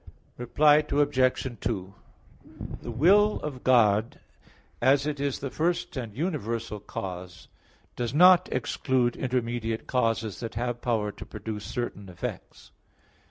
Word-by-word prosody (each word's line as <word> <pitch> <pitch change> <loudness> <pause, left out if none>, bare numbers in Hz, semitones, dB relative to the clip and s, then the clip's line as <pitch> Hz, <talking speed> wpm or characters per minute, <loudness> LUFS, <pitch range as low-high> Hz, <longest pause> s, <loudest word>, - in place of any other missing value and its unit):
Reply 145 +5 +4
Obj. 140 -4 +1
2: 95 -4 -3 0.9
The - - -7
will 195 - +4
of 135 -4 -6
God, 110 -3 +3 0.6
as 135 +3 +4
it 150 -2 -3
is 140 -1 -1
the 135 -1 -5
first 170 +1 -1
and 115 -6 -5
universal 115 - -3
cause, 90 -2 -7 0.5
does 120 -2 -2
not 180 +4 +6
exclude 125 0 0
intermediate 120 -3 -2
causes 115 -4 -1
that 115 -1 -6
have 120 +1 -2
power 110 -4 0
to - - -10
produce 105 0 -7
certain 105 -5 -5
effects. 90 - -7
120 Hz, 120 wpm, -27 LUFS, 110-140 Hz, 0.9 s, not